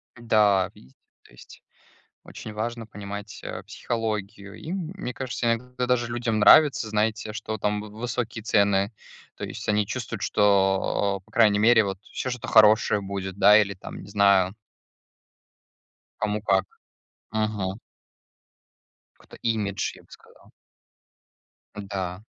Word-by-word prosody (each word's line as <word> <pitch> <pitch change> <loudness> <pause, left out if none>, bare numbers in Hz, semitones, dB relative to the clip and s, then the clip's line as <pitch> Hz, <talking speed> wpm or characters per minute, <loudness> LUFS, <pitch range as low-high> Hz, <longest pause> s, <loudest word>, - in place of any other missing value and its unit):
Да, 105 -5 +3
видите, 65 +1 -19 0.3
то - - -21
есть - - -15 0.6
очень 110 - -9
важно 115 +1 -4
понимать, 100 0 -8
а, - - -6
психологию, 105 -3 -4
и, 160 - -7
мне 180 -7 -5
кажется, 130 -2 -4
иногда 125 +1 -5
даже 120 -1 +1
людям 120 -2 -1
нравится, 135 +2 +6
знаете, 110 0 -1
что 110 0 -4
там 105 0 -1
в 105 - -9
высокие 115 0 -4
цены, 100 -1 +2 0.4
то - - -6
есть - - -7
они 105 -1 +2
чувствуют, 115 -3 -5
что, 100 -1 +2
а, - - -22
по 95 - -27
крайней 105 -3 +4
мере, 110 +1 +5
вот 95 -1 -4
всё - - -5
что-то 125 -1 -6
хорошее 110 -1 +5
будет, 95 -1 -5
да, 105 +2 +7
или 100 -1 -1
там, 95 - -9
не - - -12
знаю. 100 -2 +3 1.7
Кому 105 0 -1
как, 95 -2 +2 0.7
мгм. 105 -2 -2 1.3
Какой-то - - -17
имидж, 105 -4 -1
я - - -17
бы - - -29
сказал. - - -18 1.2
Да. 95 -2 -5
105 Hz, 135 wpm, -25 LUFS, 100-115 Hz, 1.7 s, да